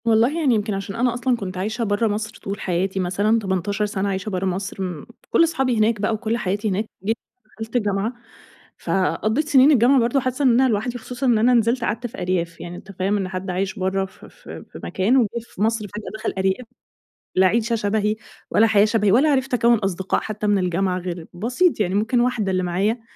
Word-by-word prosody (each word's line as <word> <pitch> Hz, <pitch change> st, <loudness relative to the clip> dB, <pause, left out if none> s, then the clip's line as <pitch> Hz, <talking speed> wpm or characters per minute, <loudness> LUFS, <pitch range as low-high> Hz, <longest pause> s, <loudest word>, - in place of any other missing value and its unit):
والله 230 Hz, +8 st, +3 dB
يعني 270 Hz, -7 st, +3 dB
يمكن 210 Hz, 0 st, -1 dB
عشان 195 Hz, 0 st, -4 dB
أنا 245 Hz, 0 st, +1 dB
أصلًا 245 Hz, 0 st, 0 dB
كنت 185 Hz, -3 st, -6 dB
عايشه 215 Hz, +5 st, -2 dB
برا 205 Hz, +1 st, +1 dB
مصر 215 Hz, +1 st, -3 dB
طول 195 Hz, 0 st, -4 dB
حياتي 190 Hz, +2 st, -1 dB
مثلًا، 200 Hz, +5 st, +1 dB
18 200 Hz, +1 st, -1 dB
سنة 200 Hz, -1 st, -2 dB
عايشه 190 Hz, +1 st, -3 dB
برا 190 Hz, -1 st, -2 dB
مصر 190 Hz, +1 st, -3 dB
م 175 Hz, -6 st, -5 dB, 0.2 s
كل 335 Hz, -, +4 dB
صحابي 270 Hz, -7 st, 0 dB
هناك 215 Hz, -1 st, +2 dB
بقى 215 Hz, -, +1 dB
وكل 220 Hz, +1 st, -1 dB
حياتي 205 Hz, 0 st, -1 dB
هناك 200 Hz, +3 st, -1 dB, 0.2 s
جيت 225 Hz, +2 st, +1 dB, 0.3 s
دخلت 220 Hz, +2 st, -9 dB
الجامعة، 205 Hz, 0 st, 0 dB, 0.6 s
فقضيت 215 Hz, +9 st, 0 dB
سنين 275 Hz, +1 st, +6 dB
الجامعة 260 Hz, 0 st, +5 dB
برضه 240 Hz, +3 st, +2 dB
حاسه 255 Hz, +2 st, -2 dB
إن -, -, +6 dB
أنا 260 Hz, -, +4 dB
لوحدي، 230 Hz, +3 st, -1 dB
خصوصًا 250 Hz, +3 st, -5 dB
إن 240 Hz, -3 st, +4 dB
أنا 240 Hz, +4 st, +4 dB
نزلت 235 Hz, +1 st, +2 dB
قعدت 230 Hz, +2 st, -2 dB
في 240 Hz, -, -9 dB
أرياف، 175 Hz, -2 st, -2 dB
يعني 175 Hz, 0 st, -7 dB
أنت 190 Hz, -, -11 dB
فاهم 195 Hz, +2 st, 0 dB
إن 195 Hz, -2 st, -2 dB
حد 185 Hz, +1 st, -5 dB
عايش 190 Hz, +3 st, -2 dB
برا 190 Hz, +1 st, 0 dB
في 190 Hz, -, -15 dB
في -, -, -11 dB
في -, -, -9 dB
مكان 210 Hz, +8 st, +1 dB
وجه 240 Hz, -4 st, +4 dB
في 225 Hz, -4 st, -11 dB
مصر 220 Hz, 0 st, +1 dB
فجأة 210 Hz, +2 st, -7 dB
دخل -, -, -2 dB
أرياف؟ 190 Hz, +6 st, 0 dB, 0.7 s
لا 185 Hz, 0 st, +5 dB
عيشة 230 Hz, +4 st, +1 dB
شبهى 210 Hz, 0 st, 0 dB, 0.4 s
ولا 225 Hz, -, +5 dB
حياة 210 Hz, -2 st, +5 dB
شبهي 210 Hz, -2 st, +2 dB
ولا 275 Hz, +8 st, +4 dB
عرفت 270 Hz, -1 st, 0 dB
أكون 235 Hz, -1 st, +4 dB
أصدقاء 190 Hz, -2 st, -1 dB
حتى 215 Hz, -1 st, -4 dB
من 205 Hz, -1 st, +3 dB
الجامعة، 185 Hz, 0 st, 0 dB
غير 175 Hz, -2 st, -6 dB
بسيط 245 Hz, -, +1 dB
يعني 190 Hz, -2 st, 0 dB
ممكن 220 Hz, +4 st, +1 dB
واحدة 240 Hz, -5 st, +1 dB
اللي 185 Hz, 0 st, 0 dB
معايا 195 Hz, +7 st, 0 dB
210 Hz, 210 wpm, -22 LUFS, 190-235 Hz, 0.7 s, سنين